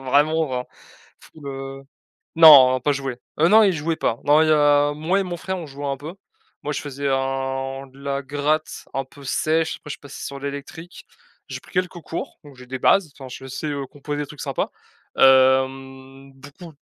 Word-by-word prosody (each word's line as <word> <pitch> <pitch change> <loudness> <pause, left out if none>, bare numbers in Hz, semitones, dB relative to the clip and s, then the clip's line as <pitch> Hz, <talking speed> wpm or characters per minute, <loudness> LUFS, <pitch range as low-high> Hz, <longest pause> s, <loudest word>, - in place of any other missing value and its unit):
enfin - - -12
vraiment 155 +4 +2
vin 125 -2 -3 0.6
fou 160 - -17
le 135 -1 -7 0.5
non 135 -6 +9
pas 145 - 0
joué. 135 -3 -4 0.2
Heu, 165 - +5
non, 220 +4 +7
il 195 - +3
jouait 160 0 -2
pas, 115 -7 -1
non, 150 +2 +5
il 160 - +2
y - - +5
a 145 -1 +4
moi 165 +6 0
et - - +1
mon 175 -1 -5
frère, 190 +2 -4
on 170 - -7
jouait 145 0 -7
un 140 -1 -2
peu. 150 +5 -9 0.5
Moi, 150 - -3
je - - -3
faisais 140 -1 -4
un 135 0 -2
de 135 +1 -20
la 140 0 -2
gratte 145 +3 -2
un 135 - -1
peu 140 +1 -16
sèche, 160 +4 0
après - - -14
je - - -2
suis - - -8
passais 145 - -9
sur 140 - -7
l'électrique. 140 +5 -8 0.4
J'ai - - -6
pris - - -19
quelques 180 -1 -2
cours 165 - -6
donc 145 -1 -14
j'ai 125 - -13
des 130 +1 -5
bases 180 +5 +3
enfin 135 -2 -9
je 130 +1 -9
sais, 135 +4 -5
heu, 140 -2 -4
composer 145 +1 -6
des - - -6
trucs 145 0 -12
sympa, - - -2 0.5
hem, 135 +1 +2
beaucoup 145 +5 -13
140 Hz, 210 wpm, -22 LUFS, 135-155 Hz, 0.6 s, non